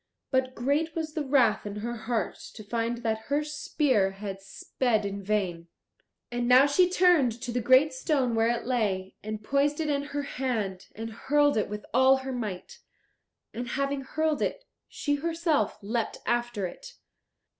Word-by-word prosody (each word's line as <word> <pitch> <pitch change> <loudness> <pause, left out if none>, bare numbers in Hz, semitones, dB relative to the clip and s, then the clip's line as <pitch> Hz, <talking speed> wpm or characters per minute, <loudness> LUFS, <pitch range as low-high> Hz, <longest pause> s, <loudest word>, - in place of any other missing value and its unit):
But 260 -1 +1
great 290 +6 0
was 315 -2 -3
the 305 - -2
wrath 260 -6 +3
in 205 -1 -6
her 235 +3 -4
heart 225 -3 -2 0.2
to 215 - -9
find 235 +2 -2
that 220 -1 -1
her 290 +1 +1
spear 280 -9 +1
had 195 -1 -6
sped 215 +3 -1
in 200 0 -4
vain. 185 -5 -1 0.6
And 240 0 -1
now 255 +2 +7
she 350 +6 +4
turned 345 -11 +3
to 240 0 -4
the 245 +1 -1
great 260 +6 +5
stone 260 -2 0
where 225 0 +3
it 235 0 -1
lay, 205 -7 -1
and 215 0 -5
poised 280 +5 +1
it 310 -2 0
in 280 0 -1
her 290 0 -3
hand, 225 -9 -3
and 225 +1 -5
hurled 290 +5 +2
it 215 - 0
with 210 0 -6
all 260 +2 +6
her 265 0 -5
might. 230 - -5 0.7
And 245 +1 -4
having 275 +2 -1
hurled 310 +3 -1
it, - - -2 0.2
she 290 -1 -1
herself 330 -2 0
leapt 225 +2 -2
after 240 -4 0
it. - - -9
245 Hz, 170 wpm, -28 LUFS, 215-290 Hz, 0.7 s, now